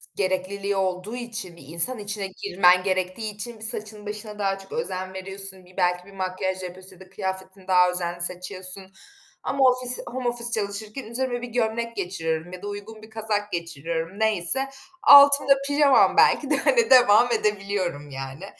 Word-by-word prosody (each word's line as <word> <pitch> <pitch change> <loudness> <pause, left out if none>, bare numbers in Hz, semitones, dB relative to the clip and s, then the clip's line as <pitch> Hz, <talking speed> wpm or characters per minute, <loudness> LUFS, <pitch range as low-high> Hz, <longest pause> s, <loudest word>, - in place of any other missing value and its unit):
Gerekliliği 195 +1 -1
olduğu 190 +3 -2
için, 235 -7 -6
bir - - -13
insan 170 - +1
içine 205 -1 -4
girmen 180 -1 +3
gerektiği 185 +3 -2
için, 225 +2 -6
bir, - - -10
saçına 215 -1 -6
başına 210 0 -7
daha 195 -1 0
çok 195 0 -15
özen 185 -5 -4
veriyorsun, 190 0 -5
bir, 180 +1 -20
belki 180 0 +1
bir 200 - -15
makyaj 185 0 -3
yapıyorsun 185 +1 -9
ya - - -21
da 190 -1 -14
kıyafetini 190 -1 -6
daha 180 -1 +5
özenli 175 -1 -3
seçiyorsun 185 +2 -6 0.5
ama 275 0 0
ofis 250 0 -1
home 250 0 -3
office 240 0 -5
çalışırken 215 +3 -4
üzerime 245 +2 -3
bir 245 - -5
gömlek 230 0 -2
geçiriyorum 170 -3 -3
ya 185 - -8
da 205 - -6
uygun 205 +2 -8
bir 220 - -13
kazak 215 -2 -3
geçiriyorum 170 +2 -4
neyse. 220 +5 0 0.3
Altımda 280 0 +8
pijamam 285 -1 +4
belki 285 - +4
de, 300 - +4
hani, 470 - +3
devam 245 -2 +6
edebiliyorum 195 -8 -1
yani. 135 +5 -7
200 Hz, 165 wpm, -24 LUFS, 185-225 Hz, 0.5 s, Altımda